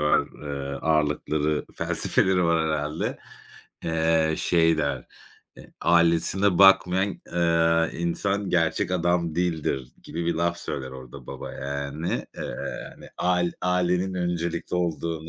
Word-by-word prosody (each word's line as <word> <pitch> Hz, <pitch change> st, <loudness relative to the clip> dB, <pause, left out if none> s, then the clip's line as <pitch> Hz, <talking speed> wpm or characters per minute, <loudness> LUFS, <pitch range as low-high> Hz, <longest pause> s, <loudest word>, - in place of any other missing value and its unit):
var. 75 Hz, 0 st, +4 dB, 0.2 s
Eee, 70 Hz, -1 st, -4 dB
ağırlıkları, 75 Hz, 0 st, 0 dB
felsefeleri 95 Hz, -2 st, +1 dB
var 85 Hz, -1 st, +2 dB
herhâlde. 75 Hz, +1 st, -2 dB, 0.7 s
Eee, 80 Hz, -1 st, +2 dB
şey 80 Hz, -2 st, +3 dB
der, 70 Hz, -2 st, -1 dB, 0.5 s
eee, -, -, -14 dB
"Ailesine 85 Hz, +3 st, +3 dB
bakmayan, 95 Hz, 0 st, +5 dB, 0.2 s
eee, 85 Hz, -1 st, +2 dB
insan 100 Hz, +3 st, -1 dB
gerçek 85 Hz, 0 st, +1 dB
adam 85 Hz, -2 st, +1 dB
değildir." 80 Hz, -7 st, -1 dB
gibi 85 Hz, +1 st, -4 dB
bir 85 Hz, -, +1 dB
laf 85 Hz, +1 st, 0 dB
söyler 65 Hz, -1 st, -5 dB
orada 65 Hz, 0 st, -11 dB
baba, -, -, -7 dB
yani. 70 Hz, +4 st, -3 dB
Eee, -, -, -5 dB, 0.5 s
yani, -, -, -14 dB
ail 90 Hz, -1 st, +1 dB
ailenin 90 Hz, +1 st, +1 dB
öncelikli 85 Hz, -1 st, -2 dB
olduğunu, 85 Hz, -2 st, -2 dB
85 Hz, 120 wpm, -25 LUFS, 75-90 Hz, 0.7 s, bakmayan